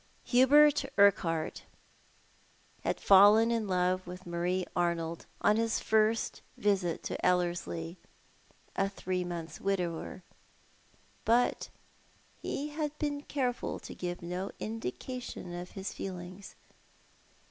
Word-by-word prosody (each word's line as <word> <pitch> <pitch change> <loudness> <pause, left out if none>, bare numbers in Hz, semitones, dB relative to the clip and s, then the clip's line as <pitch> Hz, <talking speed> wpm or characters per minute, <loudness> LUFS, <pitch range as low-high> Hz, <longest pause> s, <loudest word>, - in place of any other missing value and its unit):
Hubert 290 +4 +6
Urquhart 165 -5 +3 1.2
had - - -1
fallen 205 +4 +7
in 225 -2 0
love 185 0 +1
with 180 +1 -8
Marie 175 +2 -1
Arnold 170 -1 -1
on 210 +1 +4
his 225 0 +1
first 220 +1 +1 0.2
visit 195 -5 0
to - - -4
Ellerslie, 175 -1 0 0.8
a 195 0 +1
three 185 -2 -2
months' 170 -3 -6
widower; 180 -2 -2 1.0
but 240 +2 +2 0.7
he 290 +2 -3
had 300 0 -3
been 290 -1 -2
careful 255 -4 -2
to - - -9
give 175 -1 -5
no 180 +3 -3
indication 225 - -5
of 175 +1 -7
his 195 0 -5
feelings. 185 +1 -7
190 Hz, 105 wpm, -31 LUFS, 175-225 Hz, 1.2 s, fallen